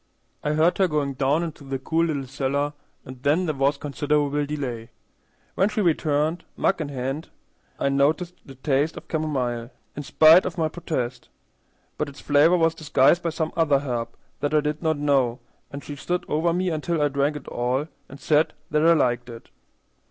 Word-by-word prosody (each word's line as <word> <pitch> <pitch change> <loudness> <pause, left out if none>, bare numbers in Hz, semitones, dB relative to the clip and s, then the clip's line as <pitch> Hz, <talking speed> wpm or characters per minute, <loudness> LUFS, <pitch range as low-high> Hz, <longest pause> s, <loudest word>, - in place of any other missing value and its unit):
I 150 - 0
heard 160 +5 +2
her 190 - +4
going 150 -4 -1
down 140 +5 +1
into 160 -3 -7
the 135 -1 -3
cool 160 +5 0
little 145 -5 -2
cellar, 140 +2 -1 0.3
and 130 -1 -10
then 150 +6 +2
there 155 - -1
was 140 +1 +1
considerable 145 0 0
delay. 125 -6 -4 0.6
When 195 - +2
she 210 - -3
returned, 155 -1 +1
mug 190 - +1
in 150 - -3
hand, 135 +3 -4 0.5
I - - +1
noticed 150 +6 +1
the 135 - -13
taste 140 +3 0
of - - -10
camomile, 125 -7 -2 0.3
in 145 - -4
spite 155 +4 +6
of 185 - -6
my 160 -2 +1
protest; 130 -8 -4 0.7
but 150 - -1
its 140 - -13
flavor 150 +5 +4
was 165 -1 +3
disguised 155 +1 +3
by 170 - -1
some 160 0 -3
other 160 -4 +3
herb 125 -4 -3 0.3
that 145 +1 -1
I 150 - +5
did 150 +1 -3
not 160 -2 +1
know, 135 -4 +1 0.3
and 140 0 -8
she 145 - -7
stood 175 +5 -3
over 160 +3 +1
me 180 +2 0
until 160 +1 -1
I 150 - +3
drank 140 +1 0
it 150 - -8
all 125 +5 -1 0.2
and 135 - -11
said 150 +2 +2 0.2
that 150 +1 +2
I 165 +1 +6
liked 125 -5 +1
it. 115 -1 -11
145 Hz, 190 wpm, -24 LUFS, 135-160 Hz, 0.7 s, spite